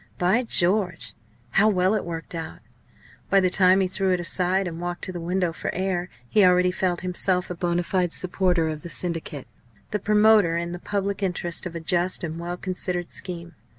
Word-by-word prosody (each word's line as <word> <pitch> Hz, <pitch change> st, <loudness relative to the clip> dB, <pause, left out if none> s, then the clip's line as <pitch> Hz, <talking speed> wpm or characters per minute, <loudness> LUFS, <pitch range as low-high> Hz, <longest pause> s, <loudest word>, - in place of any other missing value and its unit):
By 185 Hz, +7 st, +2 dB
George! 180 Hz, -3 st, +2 dB, 0.4 s
how 210 Hz, +2 st, +4 dB
well 185 Hz, -1 st, +2 dB
it 215 Hz, -, 0 dB
worked 165 Hz, 0 st, -6 dB
out! 165 Hz, -1 st, -6 dB, 0.7 s
By 195 Hz, -, +5 dB
the 185 Hz, -1 st, +2 dB
time 185 Hz, +1 st, +5 dB
he 190 Hz, -, +1 dB
threw 190 Hz, +1 st, -1 dB
it 180 Hz, -, 0 dB
aside, 180 Hz, +2 st, +1 dB
and 165 Hz, -1 st, -6 dB
walked 175 Hz, 0 st, -4 dB
to 185 Hz, -, -3 dB
the 175 Hz, -, -6 dB
window 175 Hz, 0 st, -1 dB
for 150 Hz, -, -5 dB
air, 185 Hz, -1 st, -1 dB, 0.2 s
he 210 Hz, -, +4 dB
already 180 Hz, 0 st, +4 dB
felt 180 Hz, -1 st, -1 dB
himself 180 Hz, 0 st, 0 dB
a -, -, -4 dB
bonâ 175 Hz, 0 st, -1 dB
fide 180 Hz, -2 st, 0 dB
supporter 180 Hz, -2 st, +1 dB
of 155 Hz, -1 st, -4 dB
the 170 Hz, -, -4 dB
Syndicate 165 Hz, -6 st, -3 dB, 0.5 s
the 210 Hz, -, -1 dB
promoter 210 Hz, -4 st, +4 dB
in 170 Hz, 0 st, -3 dB
the 175 Hz, -, -6 dB
public 200 Hz, +1 st, -2 dB
interest 180 Hz, -2 st, -2 dB
of 170 Hz, -, -10 dB
a -, -, -3 dB
just 175 Hz, +3 st, 0 dB
and 165 Hz, 0 st, -4 dB
well 175 Hz, +1 st, -4 dB
considered 180 Hz, -1 st, -4 dB
scheme. 170 Hz, -2 st, -7 dB
180 Hz, 195 wpm, -24 LUFS, 170-190 Hz, 0.7 s, By